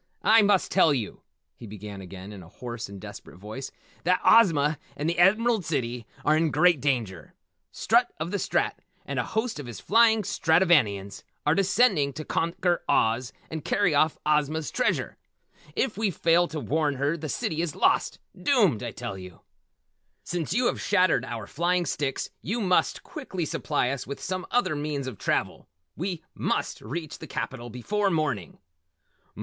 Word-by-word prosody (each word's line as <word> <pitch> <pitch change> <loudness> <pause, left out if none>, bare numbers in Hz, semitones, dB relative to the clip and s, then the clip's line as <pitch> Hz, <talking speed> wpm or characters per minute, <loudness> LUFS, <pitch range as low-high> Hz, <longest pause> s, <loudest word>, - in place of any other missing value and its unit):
"I 225 +1 +6
must 200 -2 +2
tell 165 -6 +4
you," 115 -6 -4 0.3
he 115 - -11
began 105 -1 -8
again 95 +2 -9
in 100 - -9
a 85 - -14
hoarse 120 0 -7
and 100 -1 -9
desperate 90 - -11
voice, 110 +7 -7 0.3
"that 180 +2 +3
Ozma 155 -9 +5 0.2
and 150 - -2
the 170 +1 0
Emerald 215 +3 +4
City 125 -7 -3 0.2
are 150 - +4
in 160 0 +2
great 175 -3 +3
danger. 120 -10 -2 0.4
Strut - - +2
of - - -3
the - - -1
Strat - - 0 0.3
and 140 -2 -3
a - - +1
host 220 - -2
of 140 - -7
his 120 - -7
flying 225 -2 +4
Stratovanians 150 - +2 0.2
are 150 - +4
descending 190 - +3
to 155 +1 -7
conquer 170 +1 0
Oz 115 +3 +2 0.2
and 160 -2 -5
carry 180 -6 +2
off 155 +2 +3
Ozma's 150 0 +1
treasure. - - -1 0.6
If 225 -5 -1
we 220 -2 +2
fail 170 0 +3
to 155 - -5
warn 150 0 0
her 140 +4 0
the 155 -2 -6
city 160 +4 -2
is 170 -3 -3
lost - - +2 0.2
doomed 210 - +2
I 120 - -3
tell 115 -4 -6
you! 90 -2 -11 0.8
Since 170 -4 -3
you 240 +6 +2
have - - 0
shattered 185 - +2
our 115 -4 -5
flying 175 - 0
sticks 135 -1 -2
you 225 +6 -2
must 185 -4 +1
quickly 195 - -5
supply 145 -4 -1
us 135 -2 -5
with 140 - -6
some 185 0 -4
other 210 -10 +1
means 145 -2 -3
of 130 -7 -7
travel. - - -1 0.3
We 175 -1 -4
must - - -2
reach 155 +7 -6
the - - -9
capital 120 -2 -5
before 200 - -1
morning!" 145 - -2
155 Hz, 170 wpm, -26 LUFS, 125-180 Hz, 0.8 s, I